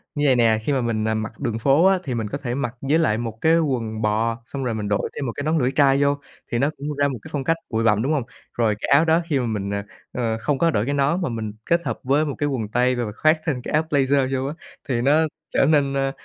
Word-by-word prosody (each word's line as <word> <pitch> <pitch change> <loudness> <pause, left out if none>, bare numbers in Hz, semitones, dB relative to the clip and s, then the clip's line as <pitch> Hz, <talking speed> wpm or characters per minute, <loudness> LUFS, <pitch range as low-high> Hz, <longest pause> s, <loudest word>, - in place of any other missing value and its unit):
như 145 0 0
vầy 130 - +5
nè, 115 -2 +3
khi 145 - 0
mà 130 - +1
mình, 110 -2 -1
à, - - +1
mặc 110 -1 -4
đường 115 -5 -2
phố 140 +8 +4
á 190 -1 +4
thì 130 -4 -3
mình 110 -2 -2
có 140 - -3
thể 125 -3 -4
mặc 120 -3 -3
với 145 +4 +2
lại 110 -9 +2
một 115 -2 -4
cái 165 +1 +4
quần 115 -8 -2
bò 115 +2 0
xong 135 +2 -5
rồi 120 - -1
mình 105 -1 -3
đội 105 - 0
thêm 140 - -3
một 120 - -2
cái 145 - -4
nón 155 +2 +1
lưỡi 125 0 +1
trai 140 -1 +3
vô 140 0 +2 0.3
thì 120 - 0
nó 140 +3 +2
cũng 145 +2 -4
ra 145 0 +3
một 130 -4 -4
cái - - -11
phong 140 -2 -1
cách 165 +4 +1
bụi 115 0 0
bặm, 105 -2 +3
đúng 140 +6 0
hông? 140 - 0 0.3
Rồi 110 -3 +1
cái - - -3
áo 140 +4 +5
đó 165 +1 +3
khi 145 -4 +2
mà 125 - -1
mình, 105 -3 -3
ờ, 100 0 -2 0.3
ơ, 115 -3 -1
không 135 +5 0
có 165 +3 +2
đội 105 -4 0
cái 140 - -1
nón 145 +6 +1
mà 175 - -1
mình 110 -3 -4
kết 170 0 +2
hợp - - -3
với 140 +4 +2
một 145 - -3
cái 145 0 +1
quần 115 -6 -2
tây 125 +3 +2
và 120 -3 -2
khoác 155 +8 +2
thêm 140 -7 -1
cái - - -6
áo 155 +1 +3
blazer 135 -2 +2
vô 135 - -2
á, 145 - -4 0.4
thì 120 -3 +1
nó 145 +5 +4 0.3
trở - - +3
nên, 140 -2 +3
ơ, 135 0 0
135 Hz, 300 wpm, -22 LUFS, 115-145 Hz, 0.4 s, vầy